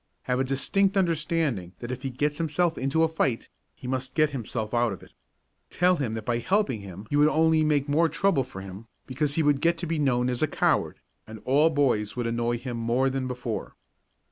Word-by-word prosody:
Have 125 0 -1
a - - +2
distinct 190 +10 +1
understanding 155 - 0
that 120 +1 -6
if 130 0 -5
he 135 - -3
gets 145 +4 -2
himself 165 +1 +1
into 140 +5 +1
a - - +4
fight, 135 -7 -1 0.3
he - - -13
must 130 0 -3
get 155 -2 +3
himself 115 -4 -4
out 120 -1 +2
of 95 - -10
it. - - -17 0.6
Tell 180 +1 +2
him 130 -7 -2
that 110 -1 -5
by 120 -1 0
helping 130 - 0
him 100 +1 -9
you 145 - +2
would 150 - +6
only 160 0 +3
make 150 -2 +1
more 160 +3 +3
trouble 195 -8 +1
for 105 -7 -9
him 95 +3 -10 0.2
because 140 +2 -2
he 160 - +2
would 145 -2 +2
get 170 +1 +2
to 170 - -4
be 165 -1 -2
known 125 -4 +2
as 125 -1 -2
a 155 - +3
coward, - - 0 0.3
and 110 0 -9
all 145 +5 +4
the 160 - -6
boys 105 -7 +1
would 120 -1 -2
annoy 120 +1 0
him 120 0 -5
more 120 +4 +1
than 130 -1 -2
before. 125 -3 -5
135 Hz, 220 wpm, -26 LUFS, 120-155 Hz, 0.6 s, would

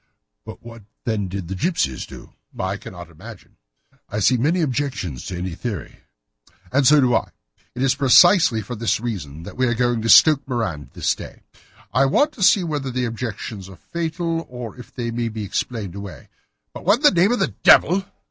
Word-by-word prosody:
"But - - -11
what, 115 -1 -11 0.2
then, 110 -4 -2
did 95 -1 -6
the 95 - -4
gipsies 95 - -1
do?" - - -13 0.2
"I 95 +1 -2
cannot 90 -3 -11
imagine." 80 - -13 0.5
"I 105 - -3
see 115 +6 +3
many 155 +9 +1
objections 130 - -3
to 90 - -5
any 90 +1 -4
such 85 - -10
theory." 110 -9 -6 0.7
"And 140 -1 +3
so 150 0 +6
do 125 -2 +2
I. - - 0 0.5
It 125 - -2
is 135 - +3
precisely 135 - +5
for 110 - -7
that 115 -2 -1
reason 85 -10 -6
that - - -10
we 130 0 +2
are 120 - 0
going 120 -1 0
to 115 - -2
Stoke 150 +1 +7
Moran 100 - -3
this - - 0
day. - - -11 0.5
I 130 +3 +4
want 290 - +2
to 240 - -13
see 190 0 +5
whether 145 -5 -3
the 125 0 -2
objections 115 -4 -6
are 95 - -12
fatal, 165 0 -3
or 125 -2 -8
if 125 - -13
they 120 -2 -4
may 115 0 -2
be 110 -1 -6
explained 105 -1 -4
away. 100 -1 -9 0.4
But - - -9
what 200 +4 +5
in 255 - -11
the 170 - +2
name 200 +5 +4
of 245 - +1
the 120 - -1
devil!" 185 +4 +5
120 Hz, 200 wpm, -21 LUFS, 100-145 Hz, 0.7 s, Stoke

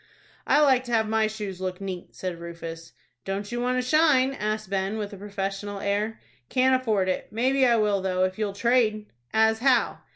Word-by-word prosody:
"I 295 - +4
like 265 -4 +4
to 240 - -6
have 220 -1 +2
my 220 0 +2
shoes 205 -4 -6
look 185 -1 -3
neat," 190 -3 -7
said 180 -2 -5
Rufus. 165 -1 -8 0.3
"Don't 200 +2 -4
you 240 0 -2
want 250 +1 0
a 255 - 0
shine?" 275 -2 +3
asked 215 -4 -3
Ben, 195 +2 -1
with 210 -1 -4
a - - -8
professional 200 0 -4
air. 205 +3 -1 0.3
"Can't 260 0 +3
afford 220 -7 +1
it. 185 - -2
Maybe 260 +4 +2
I 240 - +4
will, 210 -3 +1
though, 185 -1 0
if 185 +2 -1
you'll 210 -2 -1
trade." 220 -1 +1 0.3
"As 220 0 +3
how?" 255 -1 +2
215 Hz, 195 wpm, -26 LUFS, 195-240 Hz, 0.3 s, I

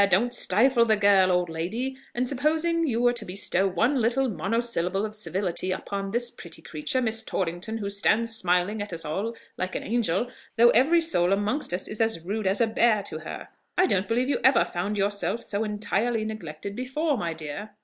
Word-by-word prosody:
don't 235 +7 +2
stifle 235 +3 +4
the 220 -2 +3
girl, 200 -3 +4
old 180 0 +2
lady! 190 +12 -3 0.2
And 250 +1 0
supposing 315 +5 +1
you 235 -4 0
were 245 0 +4
to 235 -3 -4
bestow 195 0 0
one 245 +8 +1
little 245 +4 +2
monosyllable 215 -4 0
of 215 - -6
civility 190 -3 -1
upon 195 +1 -4
this 240 +3 -1
pretty 170 -3 -11
creature, 165 - -2
Miss 225 -1 +1
Torrington, 185 +5 -3
who 205 -3 -4
stands 215 +3 +1
smiling 185 +2 +1
at 205 - -4
us 165 -1 -5
all 200 +10 -3 0.2
like 185 0 -3
an - - -3
angel, 235 +1 0 0.3
though 235 +1 +7
every 305 +9 +4
soul 185 - +2
amongst 205 - 0
us 180 +1 -2
is 215 +1 -4
as 225 -6 +1
rude 200 +4 -3
as 195 +2 +1
a 235 - +4
bear 220 -1 +2
to 155 -5 -5
her. 160 - -8 0.3
I 365 - +5
don't 195 - +1
believe 245 +3 +1
you 285 - +1
ever 265 - +5
found 195 +4 -3
yourself 205 +2 -1
so 205 +1 -1
entirely 215 +2 -1
neglected 200 -3 -6
before, 280 +5 -1
my 170 -8 -2
dear?" 160 +6 -7
215 Hz, 195 wpm, -26 LUFS, 185-240 Hz, 0.3 s, though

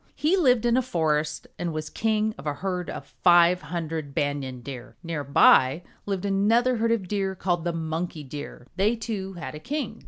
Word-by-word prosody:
He 315 +5 +2
lived 250 - +3
in 240 0 +3
a - - +4
forest 155 -9 -1
and 170 -2 -2
was 155 0 -4
king 220 -1 0
of 140 - -9
a 145 - -1
herd 180 -1 -3
of - - -6
five 175 0 +4
hundred 160 -3 -4
Banyan 140 -3 -2
Deer. 125 -1 -9
Near 165 -3 -3
by 140 +2 +5 0.2
lived 195 -1 -2
another 225 +6 +3
herd 230 +1 +1
of 215 -5 0
Deer, 195 -1 -1
called 175 -2 -1
the 175 - +1
Monkey 160 -1 -3
Deer. 145 -2 -8
They, 210 +5 +3
too, 205 -4 -4
had 170 -3 -7
a 150 - -7
king. 255 - -4
175 Hz, 190 wpm, -26 LUFS, 155-215 Hz, 0.2 s, by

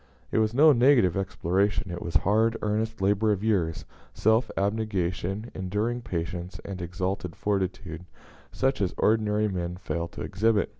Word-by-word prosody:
It - - +2
was 110 -1 +2
no 150 +6 +6
negative 120 - +4
exploration, 95 0 0
it 85 - -5
was 85 - -6
hard, 110 +3 +3
earnest 110 +1 -1
labor 105 +2 +2
of 100 -1 -1
years, 85 -7 0 0.3
self 110 +3 +2
abnegation, 100 0 -1
enduring 105 +6 -2
patience, 90 -2 -4
and 95 -2 -6
exalted 90 0 -3
fortitude, 95 -4 -2 0.5
such 135 -3 0
as 95 - -1
ordinary 105 -1 +2
men 90 -3 -3
fail 85 -2 -3
to - - -10
exhibit. 105 +2 +1
100 Hz, 145 wpm, -27 LUFS, 90-110 Hz, 0.5 s, no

